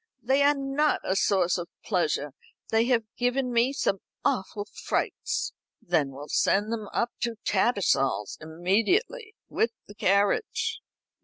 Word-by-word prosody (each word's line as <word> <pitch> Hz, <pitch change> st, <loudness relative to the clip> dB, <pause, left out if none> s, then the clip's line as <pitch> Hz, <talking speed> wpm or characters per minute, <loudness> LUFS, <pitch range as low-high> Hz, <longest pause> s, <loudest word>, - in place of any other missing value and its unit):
"They 265 Hz, +4 st, +3 dB
are 290 Hz, +1 st, +5 dB
not 275 Hz, +2 st, +1 dB
a 190 Hz, -, 0 dB
source 185 Hz, -3 st, +2 dB
of 175 Hz, -, -6 dB, 0.2 s
pleasure. 155 Hz, -7 st, 0 dB, 0.4 s
They 225 Hz, +1 st, +4 dB
have 240 Hz, -2 st, +2 dB, 0.2 s
given 250 Hz, +1 st, +1 dB
me 235 Hz, +3 st, +3 dB
some 195 Hz, -8 st, 0 dB, 0.3 s
awful 205 Hz, +1 st, -1 dB
frights." -, -, -2 dB, 0.3 s
"Then 160 Hz, -6 st, +1 dB
we'll 140 Hz, +2 st, -9 dB
send 205 Hz, +7 st, +2 dB
them 215 Hz, -2 st, -4 dB
up 235 Hz, 0 st, 0 dB
to 235 Hz, -1 st, -1 dB
Tattersall's 135 Hz, -, +1 dB
immediately, 230 Hz, -, 0 dB
with 230 Hz, +1 st, 0 dB
the 205 Hz, -, -12 dB
carriage." 210 Hz, -, +1 dB
215 Hz, 135 wpm, -27 LUFS, 180-265 Hz, 0.4 s, are